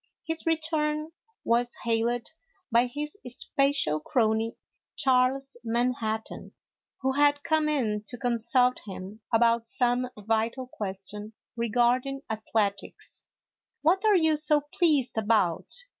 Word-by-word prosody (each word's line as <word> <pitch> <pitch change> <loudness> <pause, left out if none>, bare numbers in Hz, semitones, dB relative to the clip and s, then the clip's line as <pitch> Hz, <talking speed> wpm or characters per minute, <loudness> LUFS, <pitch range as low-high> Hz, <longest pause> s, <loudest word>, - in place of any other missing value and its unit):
His 325 0 -4
return 310 -1 0 0.3
was 240 +1 +1
hailed 235 +1 0 0.4
by 235 +2 +4
his 295 +6 -5
special 275 - 0
crony, 220 +5 0 0.4
Charles 265 +1 +1
Manhattan, 230 -2 -2 0.5
who 265 0 +1
had 290 +1 +3
come 310 0 +2
in 225 -8 0
to 245 - -3
consult 245 +1 +2
him 195 +3 -8
about 230 0 +3
some 245 +1 +1
vital 225 +4 -1
question 210 -1 -6 0.2
regarding 245 +4 +1
athletics. 215 -2 -3 0.3
" - - -61
What 365 +6 +3
are 425 -3 +5
you 320 -2 +3
so 300 -1 +3
pleased 295 - +2
about 205 -6 +1
245 Hz, 115 wpm, -27 LUFS, 225-285 Hz, 0.5 s, are